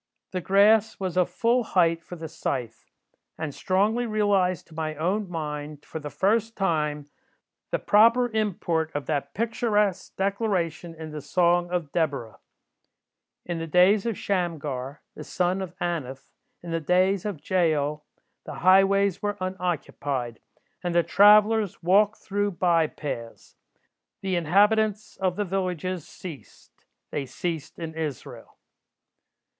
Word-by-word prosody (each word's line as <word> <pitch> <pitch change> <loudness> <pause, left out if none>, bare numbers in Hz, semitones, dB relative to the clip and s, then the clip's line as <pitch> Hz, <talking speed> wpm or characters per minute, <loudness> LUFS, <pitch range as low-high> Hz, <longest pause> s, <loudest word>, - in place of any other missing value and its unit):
The 185 - -3
grass 210 +4 +4
was 185 -2 -3
of 180 -1 +2
full 240 +2 +1
height 170 -5 +2
for 180 - -9
the 165 -1 -7
scythe, 125 -7 -4 0.5
and 160 -3 -4
strongly 210 - +1
realized 200 -4 +1
to - - -15
my 155 -1 -3
own 185 +6 -1
mind, 150 -3 -5
for 160 - -6
the 150 -1 -6
first 220 +6 0
time, 150 -6 -1 0.6
the - - 0
proper 230 +4 +4
import 175 -7 -1
of 145 - -2
that 140 -2 -3
picturesque 210 -4 0
declaration 190 -5 -1
in 160 -1 -8
the 150 -1 -6
Song 175 +4 +2
of 175 -5 -2
Deborah: 140 -10 -2 1.1
'In 175 -2 -3
the 165 - -4
days 185 +6 +4
of 225 - -2
Shamgar, 150 -8 -3
the - - -9
son 180 +1 -1
of 180 -2 -7
Anath, 140 -6 -4 0.3
in 170 - -6
the 165 - 0
days 185 +4 +2
of 175 -8 -6
Jael, 150 -5 +1 0.4
the - - -8
highways 195 +1 +4
were 205 0 -2
unoccupied, 155 -9 -3 0.4
and 175 -1 -2
the 170 - +5
travellers 210 +3 +5
walked 205 +5 +4
through 205 0 -2
by 170 -2 +2
paths. 115 -7 -7 0.7
The 190 -1 -1
inhabitants 210 +5 +2
of 185 -2 0
the 205 +1 -1
villages 185 -2 -3
ceased: 165 -7 -12 0.2
they 140 -2 -3
ceased 160 +2 -5
in 160 -1 -6
Israel. 155 -4 -6
180 Hz, 135 wpm, -26 LUFS, 155-200 Hz, 1.1 s, the